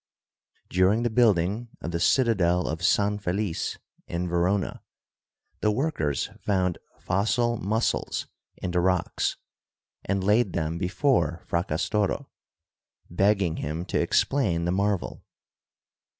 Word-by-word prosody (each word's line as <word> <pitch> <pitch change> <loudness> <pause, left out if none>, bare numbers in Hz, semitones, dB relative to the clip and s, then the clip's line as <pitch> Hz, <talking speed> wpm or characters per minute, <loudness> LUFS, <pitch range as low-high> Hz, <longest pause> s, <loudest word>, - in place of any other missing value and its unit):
During 95 +5 +3
the 120 - 0
building 110 -1 +2
of 85 - -5
the 85 - -2
citadel 90 -8 +3
of 80 +2 -3
San 105 +3 +2
Felice 100 -2 -2 0.3
in 85 +1 -2
Verona, 90 +3 0 0.8
the 105 - +2
workers 105 - -1
found 90 -3 0 0.2
fossil 115 +5 +1
mussels 110 +4 -1 0.3
in 90 - -4
the 90 - +1
rocks 90 -1 0 0.7
and 100 -1 -1
laid 105 -1 +3
them 80 +1 -2
before 95 - +1
Fracas 85 +1 -1
toro, 105 -1 -1 0.8
begging 95 -2 +2
him 80 +4 -3
to - - 0
explain 90 -12 +1
the 85 - +1
marvel. 100 0 -1
95 Hz, 115 wpm, -26 LUFS, 85-105 Hz, 0.8 s, During